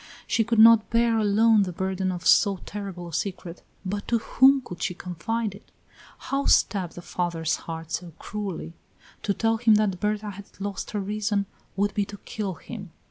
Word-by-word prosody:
She 225 - +2
could 230 +1 0
not 225 0 +7
bear 230 -1 +3
alone 215 +1 +4
the 190 -2 -1
burden 190 +1 -2
of 175 -2 -6
so 200 -2 +5
terrible 195 -4 -6
a - - -12
secret, 180 -1 -4 0.2
but 200 +2 -3
to 235 - +2
whom 265 +4 +5
could 180 -8 -9
she 180 - -1
confide 200 +6 -3
it? 200 - -16 0.5
How 275 0 -2
stab 185 -5 +3
the 175 - -10
father's 170 -3 -1
heart 165 -1 -7
so 170 +1 -4
cruelly! 195 -6 -5 0.5
To 200 - -1
tell 225 0 +1
him 225 -1 +5
that 205 -4 +1
Berta 210 +1 -1
had 200 +1 -13
lost 200 0 -4
her 210 - -2
reason 205 0 -1 0.3
would 200 +1 0
be 205 -1 0
to 205 +1 -9
kill 200 -3 -5
him. 200 +1 -9
200 Hz, 185 wpm, -26 LUFS, 180-220 Hz, 0.5 s, not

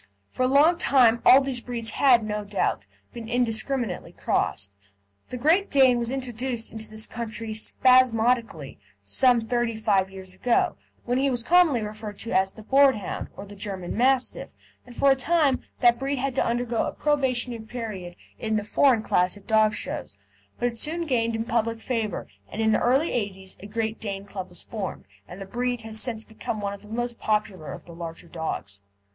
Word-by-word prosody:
For - - -5
a 255 - +4
long 300 +6 +4
time 240 -7 +4
all 265 - +8
these 265 -3 -2
breeds 235 -3 -3
had, 245 -3 +4
no 210 0 -3
doubt, 200 - -1 0.3
been 230 -1 -8
indiscriminately 240 -3 -1
crossed. 100 0 -1 0.6
The 250 - -5
Great 325 +10 +3
Dane 260 -3 +5
was 235 -1 -2
introduced 250 -2 -3
into 220 0 -8
this 215 0 -6
country 225 -1 -5
spasmodically 230 - +2 0.2
some 245 - +3
thirty 235 0 -1
five 200 -3 +1
years 190 -1 -9
ago, 235 +5 +1 0.3
when 245 +1 0
he 275 +1 +2
was 245 -3 -1
commonly 325 -6 +4
referred 210 -1 -7
to 230 - -5
as 190 +1 +2
the 220 - -13
Boarhound, 265 -5 +2
or 200 - -7
the 205 +1 -12
German 190 -3 -5
Mastiff, 255 +2 +1 0.3
and 245 - -12
for 275 +2 +4
a - - +5
time 285 -1 +2 0.2
the 240 - +7
breed 270 +3 -3
had 270 +1 -1
to 270 - +1
undergo 240 0 0
a - - -4
probationary 255 -5 0
period 215 -7 -6 0.2
in 220 -1 -1
the 210 - 0
"Foreign 235 +1 +3
Class" 180 0 +1
at 200 - -16
dog 215 -1 +3
shows, 100 - -4 0.4
but 245 - 0
it 230 -1 -5
soon 325 +6 +1
gained 230 -5 0
in 225 - -1
public 230 0 -1
favour, 225 -2 -2 0.3
and - - -6
in 220 0 +3
the - - +2
early 270 +7 +2
'eighties 190 -4 -3
a 200 - -9
Great 220 +1 -3
Dane 200 -2 -5
Club 190 -2 -7
was 175 - -9
formed, 205 -5 -6 0.2
and 180 - -10
the 195 - -6
breed 245 +3 -2
has 220 0 -2
since 230 -3 -2
become 220 0 -5
one 200 -1 -3
of 200 - -10
the 210 - -15
most 240 +2 -4
popular 205 -7 -1
of - - -9
the 170 - -12
larger 165 0 -8
dogs. 160 -12 -5
230 Hz, 190 wpm, -25 LUFS, 210-250 Hz, 0.6 s, all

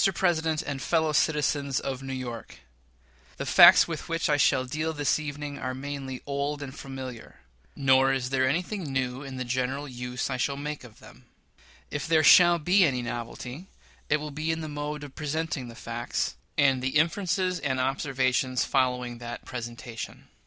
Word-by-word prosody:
PRESIDENT 160 -4 +1
AND 140 -2 -4
FELLOW 160 -2 +1
CITIZENS 145 -3 +1
OF 135 -1 -4
NEW 135 0 -5
YORK: 120 -3 -7 0.8
The - - -4
facts - - +8
with - - -6
which 165 -2 0
I - - +4
shall 130 -2 +3
deal 155 +5 -2
this 145 0 +1
evening 145 -1 -5
are 130 0 -3
mainly 135 -1 -6
old 145 +1 -2
and 135 -2 -7
familiar; 130 - -8 0.3
nor 135 -1 +4
is 130 -1 -1
there 130 -1 +2
anything 175 +1 -2
new 130 -1 -1
in 135 -2 -7
the 130 - -3
general 130 +3 -2
use 125 -1 -4
I 130 - -1
shall 140 +2 -1
make 150 0 -5
of 115 -4 -15
them. 60 - -16 0.7
If 150 +1 -3
there 160 -1 +4
shall 175 +2 +8
be 180 +5 +4
any 130 -6 +1
novelty, 120 +7 -6 0.4
it 150 - +4
will 150 0 -6
be 155 +3 -2
in 160 0 -2
the 155 - -5
mode 150 0 -4
of 140 -2 -9
presenting 155 -3 -3
the 115 - -10
facts, - - -3 0.2
and 135 -3 +4
the 130 +3 0
inferences 180 +2 +1
and 130 -2 -1
observations 130 -1 0
following 125 -3 0
that 120 0 -7
presentation. 120 -1 -7
140 Hz, 175 wpm, -27 LUFS, 130-150 Hz, 0.8 s, facts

